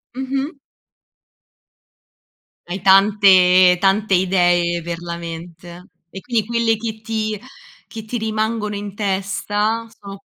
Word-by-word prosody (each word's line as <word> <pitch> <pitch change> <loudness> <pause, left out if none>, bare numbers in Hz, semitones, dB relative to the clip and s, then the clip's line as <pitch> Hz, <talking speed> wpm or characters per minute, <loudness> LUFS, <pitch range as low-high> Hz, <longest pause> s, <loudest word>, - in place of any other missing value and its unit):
Mh-mh. 270 +3 -3 2.2
Hai 190 +2 -4
tante 190 -2 +5
tante 200 +1 +2
idee 175 -2 +2
per 170 0 -5
la 170 0 -6
mente. 170 +1 -9 0.3
E, 190 +2 -9
quindi 230 -4 -1
quelle 230 -1 0
che 220 0 -6
ti 220 -1 -3 0.5
che 220 -2 -9
ti 240 +2 -4
rimangono 220 -1 -2
in 205 -1 -7
testa 205 +3 -2
sono 200 0 -10
200 Hz, 110 wpm, -19 LUFS, 180-220 Hz, 2.2 s, tante